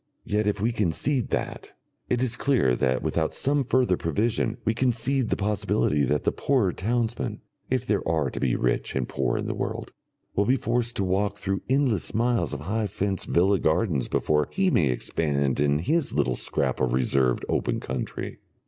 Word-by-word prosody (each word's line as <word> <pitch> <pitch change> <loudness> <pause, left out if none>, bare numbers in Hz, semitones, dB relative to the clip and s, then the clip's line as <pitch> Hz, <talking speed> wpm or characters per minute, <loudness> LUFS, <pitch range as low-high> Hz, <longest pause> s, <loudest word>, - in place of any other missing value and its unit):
Yet 105 0 0
if 105 -1 0
we 115 +4 +1
concede 115 - 0
that, - - -3 0.4
it 125 0 +1
is 125 -1 +1
clear 125 - +2
that 65 +1 0
without 80 -1 0
some 140 +1 +1
further 125 -7 +2
provision 105 +9 0
we 110 - +2
concede 125 +1 +1
the - - +1
possibility 100 -7 +1
that 75 +3 0
the - - +2
poorer 125 -10 +1
townsman 115 +2 -2 0.3
(if 130 -1 0
there 105 -5 +1
are 80 -5 +1
to - - -5
be 65 -3 +1
rich - - -1
and 65 -2 0
poor 65 -3 -1
in - - -3
the - - -2
world) - - -4 0.4
will 100 - +2
be 130 +5 +3
forced 120 0 -1
to 100 - 0
walk 100 +2 0
through 95 -1 -2
endless 130 - +1
miles 120 +1 +1
of 75 -2 -5
high 105 +6 -1
fenced 95 0 -2
villa 95 +3 +3
gardens 80 - +1
before 75 -1 +1
he 190 -1 +1
may 75 - +3
expand 70 +1 0
in 70 0 +3
his 150 - 0
little 65 -1 +1
scrap - - -1
of 65 -2 +1
reserved 65 0 +1
open - - 0
country. - - -5
100 Hz, 185 wpm, -26 LUFS, 75-120 Hz, 0.4 s, be